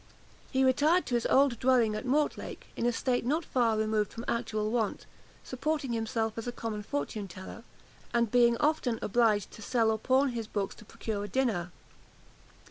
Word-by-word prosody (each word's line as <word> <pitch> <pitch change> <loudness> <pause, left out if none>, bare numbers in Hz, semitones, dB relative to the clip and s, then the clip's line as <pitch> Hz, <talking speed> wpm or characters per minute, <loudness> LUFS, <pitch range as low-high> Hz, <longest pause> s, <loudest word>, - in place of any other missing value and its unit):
He 265 -1 +2
retired 295 +7 +3
to - - -5
his 240 -1 +1
old 265 -4 +3
dwelling 250 -4 +3
at 215 +5 -4
Mortlake, 295 +3 -1
in 235 - 0
a - - +3
state 245 +1 0
not 305 +7 0
far 230 -4 +1
removed 215 -1 0
from 230 +1 -7
actual 220 -2 -1
want, 225 -4 -1 0.4
supporting 275 0 -2
himself 225 0 -1
as 230 - -6
a - - -1
common 225 -3 -4
fortune 195 +3 -3
teller, 190 +5 -10 0.5
and 235 -2 +1
being 235 -1 +5
often 295 -5 +1
obliged 215 -2 +2
to - - -12
sell 225 0 +2
or 220 - -1
pawn 265 +4 +3
his 230 -3 -4
books 200 -2 -2
to 215 - -14
procure 205 -1 -4
a - - -4
dinner. 205 -7 0
235 Hz, 180 wpm, -30 LUFS, 215-255 Hz, 0.5 s, being